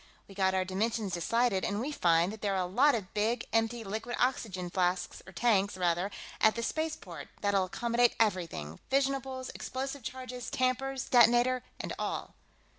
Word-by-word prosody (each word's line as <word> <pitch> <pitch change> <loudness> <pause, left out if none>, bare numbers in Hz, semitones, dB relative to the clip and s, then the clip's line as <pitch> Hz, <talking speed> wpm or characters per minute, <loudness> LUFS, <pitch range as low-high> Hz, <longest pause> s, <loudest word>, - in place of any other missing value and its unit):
We 195 - -12
got 190 -1 +1
our 185 0 +1
dimensions 205 +1 -1
decided, 215 +3 +1
and 205 - -1
we 270 +6 -2
find 170 - +3
that 220 - -10
there 200 -2 0
are 185 - +1
a - - -2
lot 260 +10 +4
of 200 -5 -5
big 225 +3 0
empty 225 +1 +1
liquid 220 +4 -4
oxygen 200 -8 -1
flasks, 180 0 0
or - - -9
tanks, 200 -1 +2
rather, 175 +1 +1 0.3
at 220 - +5
the 235 - -2
spaceport, 230 - -4
that'll 200 -2 +2
accommodate 235 +5 +2
everything 170 - -1
fissionables, 270 -1 0
explosive 270 +1 -4
charges, 250 +1 -6
tampers, 255 +1 -1
detonator, 245 +1 +5 0.2
and - - -4
all." - - -3
220 Hz, 165 wpm, -31 LUFS, 190-250 Hz, 0.3 s, at